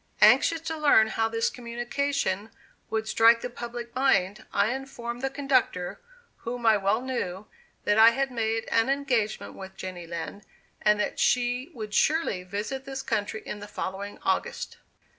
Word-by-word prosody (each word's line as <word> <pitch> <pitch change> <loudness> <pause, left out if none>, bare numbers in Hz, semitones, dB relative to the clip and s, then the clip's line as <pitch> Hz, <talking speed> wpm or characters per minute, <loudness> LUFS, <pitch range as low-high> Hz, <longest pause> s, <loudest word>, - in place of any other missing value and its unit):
Anxious 330 -1 +6
to 325 0 -3
learn 285 -8 +5
how 225 0 0
this 225 0 0
communication 240 -3 -2 0.4
would 220 0 -1
strike 230 +1 +5
the 245 - -4
public 240 0 -7
mind, 215 -6 +2
I 205 +4 +2
informed 245 -3 -6
the 270 - 0
conductor, 260 - 0 0.4
whom 240 0 -5
I 220 -1 +6
well 200 +3 +1
knew, 215 -7 -3 0.4
that 210 +1 +3
I 225 +1 +10
had 270 +3 -1
made 225 -1 -1
an 230 +3 +3
engagement 260 -6 0
with 190 0 -10
Jenny 180 -2 -6
Lind, 170 +4 -6 0.4
and 210 0 +4
that - - -1
she 245 +3 +1
would 215 -3 -6
surely 305 - +2
visit 205 +8 -4
this 270 0 -5
country 210 +1 -2
in 210 - -5
the 205 - -8
following 200 0 -5
August. 190 - -1
230 Hz, 160 wpm, -27 LUFS, 205-260 Hz, 0.4 s, I